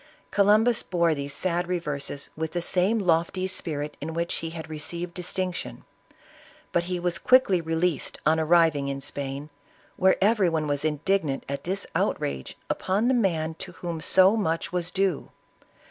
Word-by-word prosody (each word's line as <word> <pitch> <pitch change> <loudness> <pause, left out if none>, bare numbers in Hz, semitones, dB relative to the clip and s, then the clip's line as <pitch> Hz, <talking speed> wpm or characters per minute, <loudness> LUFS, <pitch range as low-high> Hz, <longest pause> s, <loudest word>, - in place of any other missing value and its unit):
Columbus 215 +4 +4
bore 170 -3 +1
these 140 -1 -4
sad 175 +3 -1
reverses 150 -5 -3
with 160 0 -4
the 175 - -1
same 190 +6 +2
lofty 180 -1 +1
spirit 150 -5 -3
in 160 +2 -5
which 170 0 -1
he 165 - -4
had 160 -1 -7
received 170 +3 -4
distinc 180 +1 -2
tion; - - -6 0.9
but 175 0 +1
he 180 0 -2
was 175 0 0
quickly 255 -9 +4
released 165 -2 -1
on 160 +1 +4
arriving 160 -3 +3
in 140 0 -3
Spain, 140 +2 -4 0.5
where 190 0 +4
every 200 -2 +3
one 160 -2 -1
was 145 -1 -1
indignant 155 -1 0
at 140 0 -5
this 190 +2 -2
outrage 65 -2 -2
upon 205 +6 0
the - - +3
man 165 -9 +1
to 185 -2 -7
whom 170 -3 -5
so 190 +5 +5
much 165 -5 -1
was 175 -1 +1
due. 190 -4 -1
170 Hz, 160 wpm, -26 LUFS, 155-185 Hz, 0.9 s, so